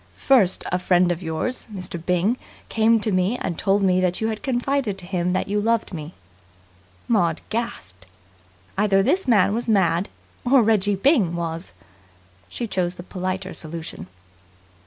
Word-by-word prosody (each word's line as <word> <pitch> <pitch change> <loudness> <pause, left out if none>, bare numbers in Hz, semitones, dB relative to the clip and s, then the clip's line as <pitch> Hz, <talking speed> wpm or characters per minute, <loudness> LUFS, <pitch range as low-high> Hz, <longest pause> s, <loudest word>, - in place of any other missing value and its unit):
First 230 -9 +3
a 180 - +1
friend 180 -1 +3
of 175 0 -3
yours, 165 +10 -3
Mr. 180 -4 -6
Byng, 180 +6 +1 0.3
came 225 +1 +3
to 215 - -1
me 185 +5 +1
and 175 - -3
told 200 +3 +1
me 185 -1 +3
that 180 -1 0
you 220 - 0
had 215 -1 -4
confided 260 -5 -1
to 185 - -8
him 180 -1 -1
that 185 - -1
you 205 +1 0
loved 230 -1 0
me." 155 0 -7 0.9
Maud 175 -8 +2
gasped. 95 - -5 0.7
Either 195 -2 +3
this 375 - +1
man 205 -4 +4
was 235 +2 -2
mad, 185 -4 +2 0.3
or 255 0 +5
Reggie 205 -2 +2
Byng 200 - +3
was. 165 +1 -4 0.8
She 240 - -4
choose 180 -4 -1
the 175 - -9
politer 185 +1 -4
solution. 160 - -6
190 Hz, 155 wpm, -23 LUFS, 175-225 Hz, 0.9 s, or